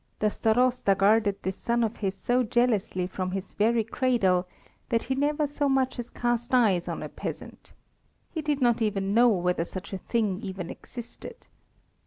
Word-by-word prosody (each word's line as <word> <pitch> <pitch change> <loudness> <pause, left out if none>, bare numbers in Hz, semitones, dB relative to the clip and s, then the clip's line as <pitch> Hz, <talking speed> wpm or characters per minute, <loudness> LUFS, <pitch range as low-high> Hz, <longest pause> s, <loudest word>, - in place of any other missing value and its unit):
The 210 0 +1
Starosta 245 -2 +2
guarded 205 0 +4
this 190 0 -3
son 235 0 0
of 225 0 -2
his 195 -2 -2
so 245 +1 +1
jealously 225 -6 +1
from 185 0 -3
his 190 +1 -5
very 225 +2 +2
cradle 210 -7 +1 0.4
that 230 -1 +1
he 265 - -1
never 295 +3 +1
so 290 0 -1
much 265 -1 +1
as 240 0 -5
cast 240 +1 -1
eyes 200 -8 +3
on - - -4
a - - -4
peasant. - - -8 0.6
He 320 - -3
did 295 -2 -1
not 240 -2 +3
even 200 -2 0
know 240 +2 +6
whether 180 -4 +1
such 185 +3 -7
a 190 - -3
thing 210 -4 -1
even 190 -3 -5
existed. 240 - -10
225 Hz, 175 wpm, -27 LUFS, 195-245 Hz, 0.6 s, know